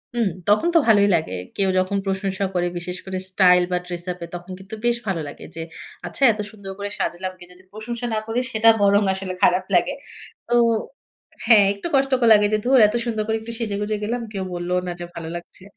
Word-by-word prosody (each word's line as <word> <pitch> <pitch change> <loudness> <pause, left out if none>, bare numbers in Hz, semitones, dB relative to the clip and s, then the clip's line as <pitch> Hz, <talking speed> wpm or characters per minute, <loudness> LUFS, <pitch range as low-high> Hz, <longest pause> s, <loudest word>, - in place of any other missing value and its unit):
হুম। 230 -4 +2 0.2
তখন 210 +11 +4
তো - - +8
ভালোই 205 -3 +5
লাগে। 160 - -2 0.2
কেউ 195 -1 +1
যখন 185 +2 0
প্রশংসা 195 0 -1
করে 175 -1 0
বিশেষ 180 +1 -5
করে 190 -1 -4
স্টাইল 180 -1 +5
বা 180 - +2
ড্রেস 175 -1 -6
আপ 180 - -8
এ - - -12
তখন 175 +2 -9
কিন্তু 190 +3 -9
বেশ 240 0 +2
ভালো 185 -4 -1
লাগে 145 - -10
যে, 165 - -5 0.5
আচ্ছা - - -9
এত 215 - -7
সুন্দর 200 -3 -9
করে 205 0 -3
সাজলাম 185 +2 -2
কি - - -12
যদি 180 +1 -18
প্রশংসা 235 +3 -6
না - - 0
করে 225 +2 -1
সেটা 225 +1 +5
বরং 200 +1 +4
আসলে 190 -1 -5
খারাপ 180 +1 +4
লাগে। - - +2 0.5
তো 240 - -1 0.9
হ্যাঁ 220 -3 +7
একটু 200 +10 -6
কষ্ট 270 0 +2 0.2
লাগে 210 -1 +5
যে, - - +4
ধুর 260 +1 +5
এত 210 - -3
সুন্দর 220 -3 -1
করে 220 0 0
একটু 225 +1 -7
সেজে 215 -4 -2
গুজে 210 +1 -1
গেলাম। 235 +3 -2
কেউ 195 -3 -4
বললঅ 175 +1 -1
না - - -2
যে 175 - -5
ভালো 165 -1 -6
লাগছে। 175 +2 -10
200 Hz, 215 wpm, -22 LUFS, 180-220 Hz, 0.9 s, তো